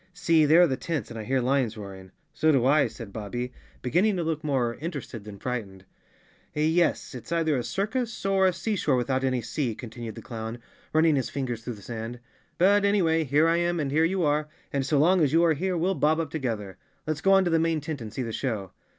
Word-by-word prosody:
See, 165 -3 +3
there 160 +4 +6
are - - +5
the 130 -3 -1
tents, 150 -7 -3
and 115 - -6
I - - -5
hear 130 +2 +1
lions 125 -3 +1
roaring." 95 -2 -9 0.2
"So 155 - +3
do 130 -4 +3
I," 145 +2 +4
said 110 -5 -10
Bobbie 120 +4 -4 0.3
beginning 180 - +2
to 175 - -1
look 160 -1 -2
more 130 -5 0
inter¬ 160 -1 -4
ested 115 -5 -9
than 105 -2 -9
frightened. 100 -6 -5 0.7
"Yes, 160 +2 +1
it's 125 +4 -9
either 165 -3 +2
a 125 - -1
circus 220 - -2
or 195 -1 +4
a - - +3
sea 210 +5 -2
shore 150 -7 +1
without 130 +1 0
any 130 -2 0
sea, 115 +1 -2
continued 115 -1 -7
the - - -9
clown, 115 0 -6 0.3
running 155 -1 +4
his 130 - -1
fingers 120 -5 -4
through 120 -1 -5
the 100 - -14
sand. 115 +2 -6 0.4
"But 200 +3 +4
anyway, 170 -6 +2
here 150 +4 +3
I 165 +1 +3
am 175 0 0
and 140 -3 -1
here 155 +3 +3
you 180 +2 +1
are, 150 0 +1 0.3
and 140 -1 +1
so 145 +2 +1
long 175 +5 +4
as 150 -2 +2
you 165 +1 +5
are 165 -2 +4
here 180 +4 -1
we'll 180 +4 +1
bob 155 -2 +2
up 160 -3 -3
together. 110 -10 -4 0.3
Let's 155 0 -2
go 195 - +4
on 195 0 +6
to 175 - +1
the 165 - +3
main 165 -1 +1
tent 150 -2 -5
and 110 -2 -7
see 130 - -3
the 115 -2 -5
show." 110 -8 -3
145 Hz, 235 wpm, -26 LUFS, 120-165 Hz, 0.7 s, there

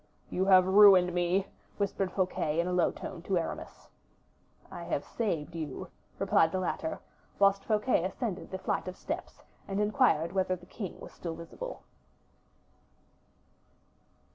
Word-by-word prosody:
"You 185 - 0
have 185 -2 +7
ruined 190 -2 +7
me," 180 +2 +1 0.3
whispered 195 -2 -1
Fouquet, 180 -4 0
in 170 - +2
a 180 - -1
low 180 -2 +3
tone, 180 -3 -7
to 185 +1 0
Aramis. 165 - -5 0.8
"I - - -7
have - - -2
saved 170 -9 -2
you," 155 -5 -5 0.3
replied 160 - +3
the 185 - -1
latter, 170 -3 -2 0.4
whilst 200 0 +3
Fouquet 215 -3 +2
ascended 195 0 -3
the 190 - -4
flight 185 - -2
of 185 - -6
steps - - -6 0.2
and 195 0 -2
inquired 210 - +2
whether 185 -1 +1
the 175 -1 -15
king 195 0 -7
was - - -10
still 165 -2 -6
visible. - - -8
185 Hz, 140 wpm, -30 LUFS, 170-200 Hz, 0.8 s, have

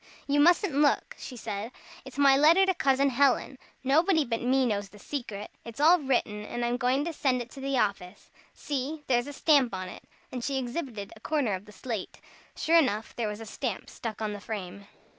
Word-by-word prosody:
"You 290 +1 +1
mustn't 345 +3 +4
look," 285 +1 +2
she 250 - -8
said, 210 +1 -5 0.3
"it's 265 0 -11
my 280 -1 +6
letter 325 +7 +6
to 380 - +2
Cousin 275 -4 +2
Helen. 265 0 +2 0.2
Nobody 320 +4 +3
but 230 -1 -2
me 260 +2 +2
knows 205 -4 -1
the 210 - -15
secret. 215 -4 -6
It's 230 +2 -10
all 335 +4 +6
written, 240 -7 -1
and 240 +3 -3
I'm 240 +1 0
going 260 +3 +1
to 340 - -3
send 265 -4 +1
it 240 0 -7
to - - -10
the 275 0 -1
office. 200 -3 -2 0.2
See 290 +2 -4
there's 240 -1 +1
a - - -5
stamp 275 -7 +3
on 185 0 -5
it;" - - -10 0.3
and 250 -2 -5
she 275 +1 -1
exhibited 245 -5 -4
a - - -15
corner 275 -4 0
of 190 +2 -5
the 210 - -14
slate. 225 -3 -6 0.4
Sure 330 +1 +4
enough, 220 -7 -1
there 235 -2 -1
was 210 +1 -5
a - - -7
stamp 225 -1 -4
stuck 220 -1 -5
on 210 -1 -2
the 205 - -7
frame. 200 -2 -6
255 Hz, 210 wpm, -28 LUFS, 215-285 Hz, 0.4 s, my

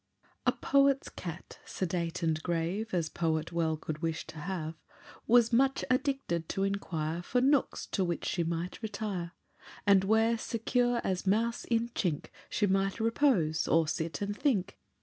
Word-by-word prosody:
A - - +7
poet's 275 -1 +2
cat, 170 -1 -8
sedate 175 -1 -3
and 160 -1 +1
grave 175 +7 -2
As 170 -3 0
poet 160 -1 -1
well 165 -2 0
could 155 0 -5
wish 165 -1 -2
to 155 - -9
have, 165 -1 -3 0.5
Was 235 0 +5
much 270 +3 +3
addicted 255 - 0
to 195 - -1
inquire 170 -5 -2
For 250 +8 0
nooks 270 +1 +2
to 195 - +1
which 175 -2 -2
she 175 - 0
might 170 +4 -3
retire, 205 -5 -4 0.5
And 200 -2 +6
where, 220 +3 +3
secure 245 +2 0
as 185 0 -2
mouse 230 +4 +1
in 230 0 +1
chink, 175 -10 -2 0.2
She 210 - +1
might 195 +1 +1
repose, 220 - +2
or 165 -1 +3
sit 160 +2 -2
and 205 0 -2
think. 210 -8 0
190 Hz, 155 wpm, -31 LUFS, 165-230 Hz, 0.5 s, A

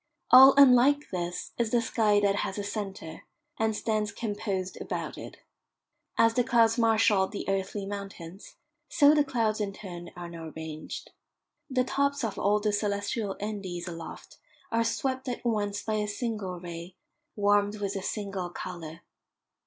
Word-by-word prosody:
All 265 +2 +10
unlike 280 +2 +6
this 175 -1 -4
is 235 -2 +1
the 240 - +3
sky 220 -2 +2
that 200 0 +2
has 195 - -2
a 205 - -2
centre, 195 -6 -6 0.4
and 220 -1 +1
stands 215 -1 -1
composed 205 -4 -3
about - - -4
it. - - -9 0.8
As 230 0 +5
the 245 - +2
clouds 230 0 +3
marshalled 220 -4 +3
the 205 - -5
earthly 195 +1 -2
mountains, 195 -2 -8 0.3
so 290 +1 +6
the 300 -1 +4
clouds 225 -5 0
in 200 -1 -2
turn 175 -4 -8
are 175 -1 -7
now 165 -2 -8
ranged. 160 -1 -7 0.6
The 255 -1 +2
tops 280 +1 0
of 220 -3 -3
all 205 +1 +3
the 210 0 0
celestial 205 0 -1
Andes 195 -4 -5
aloft 165 -1 -9 0.3
are 230 0 +2
swept 260 +3 -2
at 245 - -5
once 205 -3 -1
by 215 -1 -1
a 210 0 -1
single 205 -4 -3
ray, 170 +1 -8 0.4
warmed 205 0 +2
with 200 0 -2
a 195 - -2
single 195 -3 -4
colour. 170 -2 -7
205 Hz, 155 wpm, -28 LUFS, 190-230 Hz, 0.8 s, All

